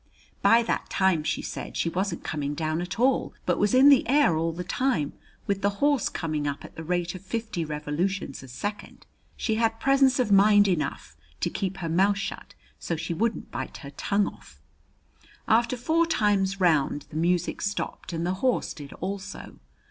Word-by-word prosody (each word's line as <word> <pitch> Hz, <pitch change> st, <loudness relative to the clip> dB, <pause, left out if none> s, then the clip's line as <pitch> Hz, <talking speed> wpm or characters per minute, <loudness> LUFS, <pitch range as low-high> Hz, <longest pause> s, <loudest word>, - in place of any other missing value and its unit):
By 230 Hz, +1 st, +5 dB
that -, -, -2 dB
time, 190 Hz, -5 st, +2 dB
she -, -, -2 dB
said, -, -, -6 dB
she -, -, 0 dB
wasn't 180 Hz, +1 st, -2 dB
coming 145 Hz, -1 st, -3 dB
down 155 Hz, +2 st, -1 dB
at 180 Hz, +4 st, -5 dB
all, 260 Hz, +2 st, +2 dB
but 175 Hz, -1 st, +1 dB
was 205 Hz, +3 st, +2 dB
in 270 Hz, +2 st, +8 dB
the 275 Hz, -4 st, +5 dB
air 275 Hz, -, +4 dB
all 165 Hz, +1 st, 0 dB
the 175 Hz, +2 st, -5 dB
time, 190 Hz, -, 0 dB, 0.3 s
with 200 Hz, -1 st, -1 dB
the 200 Hz, 0 st, 0 dB
horse 285 Hz, 0 st, +2 dB
coming 155 Hz, -3 st, -2 dB
up 140 Hz, -1 st, -4 dB
at -, -, -13 dB
the 160 Hz, -, -7 dB
rate 175 Hz, +1 st, -1 dB
of 185 Hz, -, -8 dB
fifty 220 Hz, -3 st, -3 dB
revolutions 150 Hz, +2 st, -3 dB
a 135 Hz, -, -11 dB
second. 205 Hz, +12 st, -6 dB, 0.3 s
She 220 Hz, -2 st, -1 dB
had 225 Hz, 0 st, +1 dB
presence 270 Hz, 0 st, +4 dB
of 240 Hz, -5 st, +1 dB
mind 205 Hz, +1 st, +6 dB
enough 150 Hz, -, -2 dB, 0.3 s
to -, -, 0 dB
keep 195 Hz, 0 st, -3 dB
her 170 Hz, -, -4 dB
mouth 195 Hz, +5 st, +3 dB
shut 195 Hz, -, -6 dB, 0.2 s
so 170 Hz, -, -2 dB
she 165 Hz, +1 st, -3 dB
wouldn't 225 Hz, +6 st, -2 dB
bite -, -, -5 dB
her 140 Hz, -, -8 dB
tongue 200 Hz, +7 st, 0 dB
off. -, -, -10 dB, 0.9 s
After 235 Hz, +3 st, +3 dB
four 320 Hz, +7 st, +2 dB
times 200 Hz, -8 st, +1 dB
round 150 Hz, -5 st, +2 dB
the -, -, -10 dB
music 175 Hz, +1 st, 0 dB
stopped 205 Hz, -2 st, -3 dB
and 165 Hz, 0 st, -2 dB
the 180 Hz, -, 0 dB
horse 255 Hz, -2 st, +1 dB
did 145 Hz, -3 st, -10 dB
also. 195 Hz, +1 st, -6 dB
190 Hz, 185 wpm, -26 LUFS, 165-220 Hz, 0.9 s, in